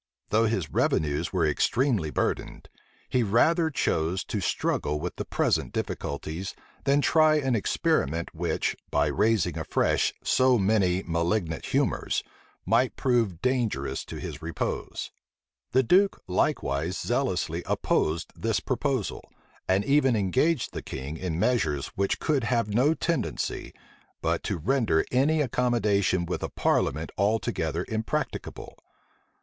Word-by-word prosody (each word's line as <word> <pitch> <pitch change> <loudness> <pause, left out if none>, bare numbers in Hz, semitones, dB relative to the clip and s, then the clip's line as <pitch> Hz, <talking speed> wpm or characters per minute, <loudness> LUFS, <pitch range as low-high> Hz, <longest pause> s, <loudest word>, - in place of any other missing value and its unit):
Though 110 +2 +3
his 95 - -2
revenues 75 +1 +1
were 90 -4 +1
extremely 105 - +1
burdened, - - -2 0.4
he 125 - +1
rather 160 - +3
chose 90 - 0
to 105 - -3
struggle 75 -4 -1
with 90 +3 -4
the - - -3
present - - 0
difficulties, 80 +6 -4 0.3
than 140 +1 +4
try 155 0 +4
an 135 -5 +1
experiment 85 -5 0
which, - - -1
by - - +2
raising 110 -2 +1
afresh - - +1
so 130 -1 +4
many 95 -3 +2
malignant 85 0 -1
humors, - - 0 0.4
might 120 +3 +2
prove 115 -9 0
dangerous 115 - 0
to - - -8
his 75 - -6
repose. 80 -1 -4 0.6
The 130 +1 +4
duke 195 - +3
likewise 80 -3 0
zealously - - -1
opposed 80 +2 0
this 115 -2 0
proposal, 130 -4 -2 0.4
and 95 +2 +2
even 135 -2 +3
engaged 125 - +1
the - - -4
king 70 +4 -6
in 80 -1 -3
measures 80 - +1
which 100 0 0
could 140 -6 0
have 115 -4 0
no 140 +8 +3
tendency, 170 0 -2 0.5
but - - 0
to - - -1
render 110 - +1
any 150 +5 +3
accommodation 110 -8 +1
with 90 - -3
a - - -3
parliament 80 +4 0
altogether 105 +3 0
impracticable. 110 0 -4
105 Hz, 125 wpm, -27 LUFS, 85-130 Hz, 0.6 s, than